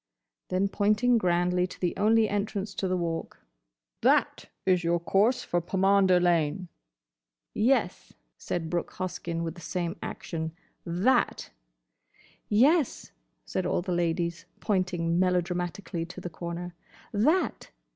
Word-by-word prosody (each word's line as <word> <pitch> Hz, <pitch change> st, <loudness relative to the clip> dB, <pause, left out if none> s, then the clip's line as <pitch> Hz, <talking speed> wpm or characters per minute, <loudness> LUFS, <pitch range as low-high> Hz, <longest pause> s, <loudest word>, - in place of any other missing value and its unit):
Then, 185 Hz, +2 st, +1 dB
pointing 215 Hz, +4 st, +2 dB
grandly 180 Hz, -1 st, +1 dB
to -, -, -12 dB
the 175 Hz, -2 st, -1 dB
only 220 Hz, +2 st, +4 dB
entrance 205 Hz, -1 st, -2 dB
to 195 Hz, -, -2 dB
the 185 Hz, 0 st, 0 dB
Walk, 165 Hz, -2 st, -3 dB, 0.6 s
"That -, -, +2 dB, 0.2 s
is 180 Hz, -2 st, +3 dB
your 170 Hz, +1 st, +2 dB
course 215 Hz, +9 st, +2 dB
for 175 Hz, -, 0 dB
Pomander 190 Hz, 0 st, +3 dB
Lane." 175 Hz, 0 st, +1 dB, 0.8 s
"Yes," 225 Hz, -5 st, +1 dB, 0.2 s
said 165 Hz, -2 st, -3 dB
Brooke 175 Hz, +1 st, -2 dB
Hoskyn, 170 Hz, -2 st, -4 dB
with 165 Hz, -1 st, -3 dB
the 175 Hz, -, -13 dB
same 170 Hz, -1 st, -3 dB
action, 160 Hz, -1 st, -5 dB, 0.3 s
"That!" 185 Hz, +10 st, +1 dB, 1.0 s
"Yes," 275 Hz, +7 st, +3 dB, 0.3 s
said 185 Hz, -, -2 dB
all -, -, 0 dB
the 185 Hz, -, -4 dB
ladies, 170 Hz, -1 st, -1 dB
pointing 180 Hz, -4 st, 0 dB
melodramatically 180 Hz, -1 st, -1 dB
to 185 Hz, -, -9 dB
the 175 Hz, -1 st, -6 dB
corner, 170 Hz, +1 st, -6 dB, 0.4 s
"That!" 300 Hz, -, +1 dB
180 Hz, 125 wpm, -28 LUFS, 170-200 Hz, 1.0 s, only